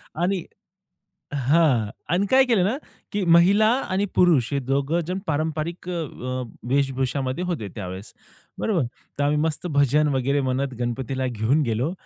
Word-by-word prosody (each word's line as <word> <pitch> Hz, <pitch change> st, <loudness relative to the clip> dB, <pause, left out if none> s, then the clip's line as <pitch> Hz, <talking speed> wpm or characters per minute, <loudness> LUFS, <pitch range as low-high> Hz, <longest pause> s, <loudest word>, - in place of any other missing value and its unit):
आणि 175 Hz, +2 st, 0 dB, 0.9 s
हां. 135 Hz, -5 st, +3 dB, 0.2 s
आणि 185 Hz, +4 st, +1 dB
काय 265 Hz, +5 st, +5 dB
केलं 230 Hz, -8 st, +2 dB
ना, 215 Hz, +7 st, +1 dB, 0.4 s
की 200 Hz, -2 st, 0 dB
महिला 180 Hz, +6 st, +5 dB, 0.2 s
आणि 190 Hz, +2 st, +1 dB
पुरुष 155 Hz, -9 st, +3 dB
हे 140 Hz, -, +1 dB
दोघं 140 Hz, +5 st, 0 dB
जण 185 Hz, +2 st, -2 dB
पारंपरिक 160 Hz, +3 st, -2 dB
अ, 180 Hz, -, -2 dB
अ, 130 Hz, -6 st, -4 dB, 0.3 s
वेशभूषामध्ये 135 Hz, +2 st, 0 dB
होते 165 Hz, -, -3 dB
त्यावेळेस, 95 Hz, -1 st, -7 dB, 0.5 s
बरोबर. 180 Hz, -, +1 dB, 0.3 s
तर -, -, +1 dB
आम्ही 145 Hz, +1 st, +2 dB
मस्त 160 Hz, +3 st, -1 dB
भजन 145 Hz, +2 st, +4 dB
वगैरे 135 Hz, +2 st, +1 dB
म्हणत 130 Hz, 0 st, -1 dB
गणपतीला 130 Hz, +2 st, -2 dB
घेऊन 125 Hz, +5 st, +1 dB
गेलो 125 Hz, +6 st, -1 dB
145 Hz, 145 wpm, -24 LUFS, 130-175 Hz, 0.9 s, काय